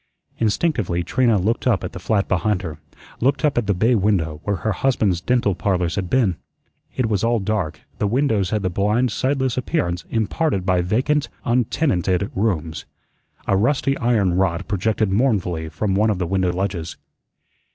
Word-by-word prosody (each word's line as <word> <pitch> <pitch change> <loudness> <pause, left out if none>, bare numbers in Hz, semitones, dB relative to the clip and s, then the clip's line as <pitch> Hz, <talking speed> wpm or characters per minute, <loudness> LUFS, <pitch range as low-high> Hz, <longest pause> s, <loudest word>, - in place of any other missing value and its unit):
Instinctively 110 - 0
Trina 115 +4 +2
looked 110 +7 0
up 115 -6 +2
at - - -4
the 90 - -8
flat 100 +2 0
behind 95 +1 0
her; 80 -3 -6 0.4
looked 140 +5 +1
up 150 - +2
at 120 -4 0
the 100 - +3
bay 115 +7 +3
window 95 -8 +1
where 100 - 0
her 110 +4 -2
husband's 100 -5 +1
"Dental 120 -1 +1
Parlors" 90 -2 0
had 95 -4 -3
been. 110 -10 +2 0.6
It 130 - +1
was 105 -3 0
all 115 +1 +2
dark; 95 -6 -2 0.2
the 105 - +1
windows 110 -5 +1
had 105 -2 -1
the 95 - 0
blind, 105 +6 +1
sightless 130 0 0
appearance 95 - -1
imparted 110 - 0
by 90 -1 +2
vacant, 130 +11 0 0.2
untenanted 105 - +1
rooms. 85 -7 -1 0.6
A 100 - +2
rusty 135 +6 +1
iron 110 -7 +2
rod 90 0 0
projected 105 +1 0
mournfully 95 -8 0
from 100 +4 -2
one 105 +3 +3
of 105 - 0
the 90 - -1
window 95 0 +1
ledges. 90 -3 -3
100 Hz, 170 wpm, -21 LUFS, 90-120 Hz, 0.6 s, the